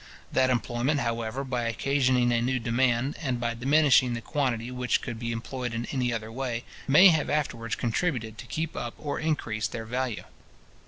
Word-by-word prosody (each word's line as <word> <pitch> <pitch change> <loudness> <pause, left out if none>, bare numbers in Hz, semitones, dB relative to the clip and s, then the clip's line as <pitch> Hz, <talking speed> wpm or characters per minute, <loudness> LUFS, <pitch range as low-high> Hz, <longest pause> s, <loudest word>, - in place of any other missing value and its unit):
That 130 -1 +3
employment, 125 +4 0
however, 115 +2 -2
by 125 -3 -2
occasioning 125 +1 +2
a 120 -1 +2
new 130 +2 +1
demand, 125 +2 +1
and 130 -6 -1
by 120 -1 -1
diminishing 130 0 +4
the - - -3
quantity 125 -3 -1
which 125 -1 0
could 115 -2 -5
be 115 0 -3
employed 120 +1 -4
in 115 +1 -2
any 125 -3 0
other 110 -1 -4
way, 120 -1 -3 0.2
may 165 +8 +8
have 160 -3 +1
afterwards 115 -7 -1
contributed 115 -3 -2
to - - -8
keep 160 +6 -3
up 120 - -4
or 145 -2 -3
increase 130 -9 -1
their 115 -2 -6
value. 125 0 -2
125 Hz, 175 wpm, -27 LUFS, 115-135 Hz, 0.2 s, may